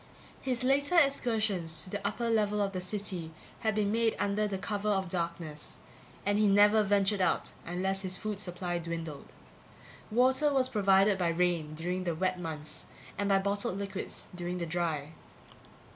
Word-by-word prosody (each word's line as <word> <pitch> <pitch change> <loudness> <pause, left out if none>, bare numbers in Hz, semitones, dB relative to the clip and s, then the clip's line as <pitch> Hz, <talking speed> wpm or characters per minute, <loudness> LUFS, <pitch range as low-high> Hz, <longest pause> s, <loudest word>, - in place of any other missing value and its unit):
His 255 -2 -1
later 280 +6 +3
excursions 215 - +2
to 185 - -8
the 200 -1 -2
upper 235 +3 -2
level 210 -2 +2
of 200 -1 +1
the 185 -2 -3
city 185 -3 -3 0.3
had 220 -2 0
been 205 -1 +1
made 230 0 +2
under 205 +1 +1
cover 205 +2 -2
of 190 -3 +1
darkness 170 -3 -4 0.5
and 205 +1 +2
he 215 - +4
never 205 +2 +6
ventured 200 0 +2
out 185 - +1 0.2
unless 190 +3 -1
his 185 -1 -2
food 210 0 -4
supply 175 -2 -3
dwindled. 165 -3 -6 0.8
Water 260 +6 +4
was 260 -2 +2
provided 195 -1 +4
by 175 - +2
rain 165 -3 0
during 180 +3 -2
the 170 -3 -1
wet 185 +2 0
months 155 -3 -5 0.3
and 200 0 -1
by 195 - +5
bottled 200 -1 0
liquids 195 -1 -5
during 175 0 -3
the 175 - -2
dry. 160 -3 -2
195 Hz, 160 wpm, -31 LUFS, 175-210 Hz, 0.8 s, never